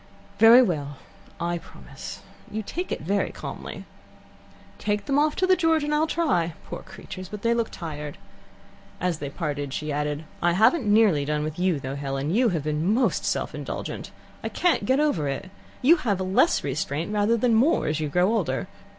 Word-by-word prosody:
"Very 235 +3 +9
well. 145 - -2 0.4
I 170 0 -1
promise. - - -10 0.3
You 220 +1 -4
take 355 - -4
it - - -2
very 200 +4 0
calmly. - - -7 0.5
" - - -25
"Take 205 -1 -1
them 280 +1 +2
off 300 0 +2
to 370 - +2
the 370 0 +5
George, 325 -3 +2
then, 295 - -2
and - - +1
I'll 305 +2 +2
try. 260 - +1
Poor - - -6
creatures! 185 -1 -9
but 210 0 -8
they 230 0 +3
look 230 -1 0
tried." 150 -4 -6 0.8
As 175 -3 -1
they 145 - -4
parted, 145 -2 -3
she 150 0 -3
added: 150 +1 -2 0.2
"I 175 0 +3
haven't 225 - +4
nearly 205 -9 +4
done 150 +1 -1
with 155 +2 -4
you, 180 -4 +2
though, 130 0 -5
Helen. 140 +2 -2
You 240 +2 +4
have 165 -6 -1
been 155 +5 0
most 245 +4 +1
self - - -1
indulgent. - - -5 0.3
I - - -2
can't 355 -2 +1
get 260 +2 +3
over 285 - +1
it. 160 +8 -4 0.3
You 325 +7 +7
have 210 -10 -1
less 185 +1 +2
restraint 145 +6 -2
rather 210 +3 +2
than 235 +1 +2
more 250 +9 +3
as 150 +1 0
you 155 -1 -2
grow 180 +7 +2
older. 225 - -1
185 Hz, 195 wpm, -25 LUFS, 150-235 Hz, 0.8 s, Very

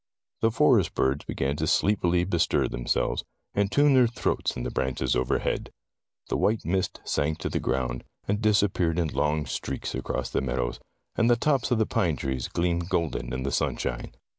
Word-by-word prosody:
The 115 - +4
forest 115 - +3
birds 65 +2 +1
began 70 +1 -1
to 80 - -1
sleepily 90 -2 +2
bestir 85 -3 +1
themselves, - - -1 0.3
and 100 0 +1
tune 145 0 +5
their 130 -2 +6
throats 115 - -1
in - - -3
the - - -3
branches 65 -1 0
overhead. 60 0 0 0.6
The - - -1
white 110 +1 +1
mist 95 +2 -1
sank 75 +2 0
to 75 - -3
the - - -1
ground, 65 -2 -1 0.2
and 105 +2 0
disappeared 100 -6 +2
in 85 -3 +1
long 75 +1 0
streaks - - -4
across - - -3
the - - 0
meadows, 60 -2 -2 0.4
and 115 - +3
the 120 - +6
tops 135 +2 +1
of 120 - +2
the 110 - +3
pine 85 -6 +1
trees 65 -2 -3
gleamed 85 0 -1
golden 85 -4 -1
in 65 +1 -3
the 70 - -2
sunshine. - - -2
85 Hz, 180 wpm, -27 LUFS, 65-105 Hz, 0.6 s, their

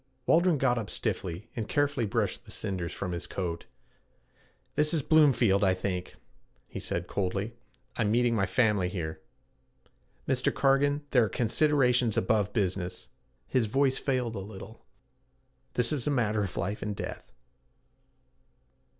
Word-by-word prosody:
Waldron 170 -1 +4
got 125 -3 +2
up 110 - -5
stiffly 90 +3 -3
and 110 -2 -4
carefully 145 -5 +1
brushed 100 - -1
the - - -12
cinders 95 -5 -3
from 90 - -4
his 85 -1 -4
coat. 85 -3 -4 1.1
'This 150 +3 +2
is 155 - +2
Bloomfield, 125 -11 +4
I 95 -1 +4
think,' 90 -1 -4 0.5
he - - -7
said 85 0 -3
coldly. 100 +4 -2 0.4
'I'm 110 -3 +1
meeting 120 +2 +3
my 100 -4 +1
family 100 -3 +2
here. 80 -5 -5 1.1
Mr. 130 -1 +1
Cargan, 145 +1 +2
there 125 -4 +5
are - - -3
considerations 125 -1 +2
above 105 +1 +2
business.' 95 -4 -2 0.4
His 120 - +1
voice 135 +3 +2
failed 125 -4 -1
a - - -3
little. 100 +3 -10 0.9
'This 125 +3 +3
is 140 -4 -1
a - - +3
matter 110 -6 +1
of 95 -3 -4
life 100 +2 -2
and 105 -1 -3
death.' - - -7
110 Hz, 140 wpm, -29 LUFS, 95-130 Hz, 1.1 s, there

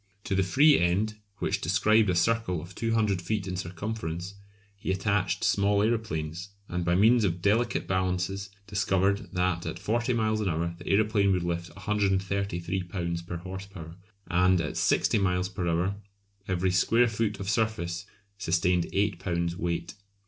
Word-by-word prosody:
To - - -2
the 95 - +3
free 140 - +5
end, 100 +5 +1 0.2
which - - -1
described 110 -1 +3
a 90 - +2
circle 90 -1 +1
of 85 +4 -10
200 110 -5 0
feet 100 +2 -2
in 90 - -3
circumference, 90 0 -4 0.4
he 100 - -6
attached 95 0 0
small 100 0 +3
aeroplanes, 95 -6 -2 0.2
and 90 0 -2
by 85 +1 +2
means 110 +5 +5
of 90 -3 0
delicate 105 +6 +1
balances 95 +1 -1 0.2
discovered 100 -1 0
that 90 -1 0
at 90 - -4
40 115 +6 0
miles 110 -2 +1
an 100 - 0
hour 85 +1 -1
the - - -11
aeroplane 100 -1 +3
would 90 -2 0
lift 85 0 -3
133 95 -2 -1
lbs. 85 -1 -4
per 85 - -4
horse 95 +2 -7
power, 85 -4 -10 0.3
and 90 +1 +3
at 75 -2 -3
60 - - +2
miles 90 -1 +1
per 95 -3 -3
hour 90 +4 0 0.5
every 95 0 +1
square 115 +7 +3
foot 110 -2 -1
of 100 - -5
surface 105 -5 -1 0.3
sustained 90 -2 +1
8 100 -3 0
lbs. 85 -2 -1
weight. 85 0 -3
95 Hz, 160 wpm, -28 LUFS, 85-105 Hz, 0.5 s, free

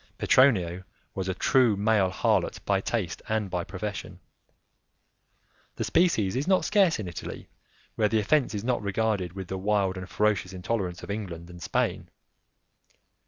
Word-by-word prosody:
Petronio 95 -9 +3 0.3
was 95 -1 -3
a 95 - -1
true 120 -4 +3
male 105 -2 +3
harlot 90 - 0
by 100 -1 +2
taste 100 -6 -2
and 110 -3 -1
by 90 -1 -1
profession. 95 -2 -6 1.6
The - - -2
species 125 - +2
is 135 +5 -1
not 190 -1 +3
scare 200 -3 +4
in 105 - -5
Italy, 85 -3 -7 0.4
where 105 -1 +1
the 110 - +2
offence 125 +3 +1
is 100 - -3
not 125 -1 0
regarded 100 -3 -1
with 95 -1 -6
the 95 +1 -4
wild 100 -1 +1
and 95 0 -7
ferocious 105 -3 0
intolerance 90 -2 -3
of - - -5
England 90 -5 -6
and 85 0 -12
Spain. 70 - -1
100 Hz, 155 wpm, -27 LUFS, 90-110 Hz, 1.6 s, scare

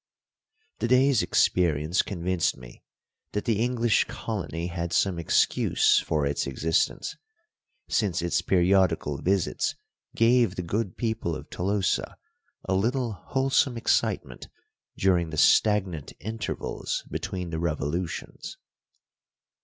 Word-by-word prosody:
The - - 0
day's 130 0 +4
experience 85 0 +2
convinced 90 -3 -1
me - - -13 0.5
that 105 - -2
the 110 -3 +1
English 120 -2 +2
colony 85 -7 -4
had 85 -1 -4
some 95 -4 +1
excuse 85 - +3
forits 70 -3 -1
existence, 80 +5 -1 0.7
since 95 -6 0
its 85 +1 +1
periodical 90 -5 +2
visits 95 -1 0 0.4
gave 115 -3 +3
the 90 - -3
good 100 +2 -2
people 110 -8 -2
of - - -10
Tolosa 95 +1 -1 0.5
a - - -1
little 120 +5 0
wholesome 135 +3 0
excitement 115 - -1 0.5
during 90 -3 +2
the 80 - -6
stagnant 95 -5 +3
intervals 110 +2 -4
between 90 -2 -4
the 80 - -3
revolutions. 80 +1 -3
90 Hz, 105 wpm, -26 LUFS, 85-110 Hz, 0.7 s, day's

